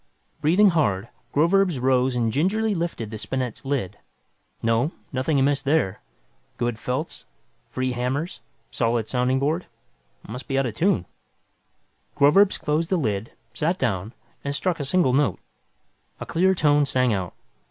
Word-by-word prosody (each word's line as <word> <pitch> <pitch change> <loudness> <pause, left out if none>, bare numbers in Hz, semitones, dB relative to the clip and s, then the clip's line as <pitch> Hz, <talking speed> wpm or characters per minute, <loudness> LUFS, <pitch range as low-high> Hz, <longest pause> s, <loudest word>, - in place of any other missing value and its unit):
Breathing 185 +7 +5
hard, 115 - 0 0.2
Groverzb 170 0 +3
rose 130 0 +2
and 115 -2 0
gingerly 210 +9 +1
lifted 165 - -3
the 110 - -5
spinet's 130 +1 -3
lid. 120 -8 -2 0.6
No, 115 +7 +1 0.2
nothing 135 +3 +1
amiss 140 +1 +2
there. 135 -9 0 0.6
Good 120 -2 -2
felts, 130 +7 -4 0.4
free 130 0 -2
hammers, 125 +2 -2 0.3
solid 115 -2 0
sounding 125 +1 +1
board 155 +6 -1 0.6
must 125 +4 -7
be 135 - -1
out 135 - +2
of 120 - -3
tune. 115 - +1 1.1
Groverzb 185 +8 +5
closed 155 +2 0
the 185 - +2
lid, 110 - -2 0.2
sat 170 +4 0
down 110 - -1 0.3
and 140 0 -2
struck 175 +2 -1
a 145 - -2
single 140 -3 +2
note. 135 - +2 0.8
A - - -5
clear 190 +3 +2
tone 145 -3 +3
sang 125 -4 +2
out. 95 -4 -3
135 Hz, 140 wpm, -24 LUFS, 120-160 Hz, 1.1 s, Breathing